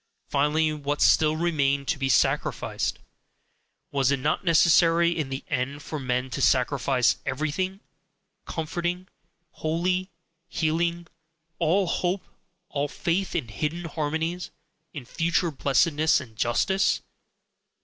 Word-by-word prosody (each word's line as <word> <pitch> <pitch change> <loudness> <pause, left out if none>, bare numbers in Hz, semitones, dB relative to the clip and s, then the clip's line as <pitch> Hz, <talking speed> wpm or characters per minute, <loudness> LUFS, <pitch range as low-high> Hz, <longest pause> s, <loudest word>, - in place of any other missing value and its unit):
Finally, 150 +2 +2
what 145 0 -3
still 155 0 +4
remained 140 -5 +1
to 155 - -1
be 135 -1 0
sacrificed? - - +1 0.9
Was 135 -2 +2
it 140 - +2
not 145 +4 -1
necessary 170 0 +4
in 155 -5 -2
the 135 0 -5
end 140 +1 -2
for 155 - -5
men 125 0 -2
to - - -3
sacrifice 130 -1 +2
everything 185 +8 -2 0.7
comforting, 175 +3 -3 0.4
holy, 180 +4 -1 0.4
healing, 170 +1 -1 0.5
all 190 +5 +2
hope, 180 +2 -1 0.5
all 145 0 -1
faith 175 +6 -2
in 150 -10 -2
hidden 150 +11 -3
harmonies, 160 +3 -2 0.4
in 140 -5 -8
future 165 +4 0
blessedness 150 +3 +2
and 115 -6 -11
justice? 190 - +1
155 Hz, 115 wpm, -26 LUFS, 140-170 Hz, 0.9 s, still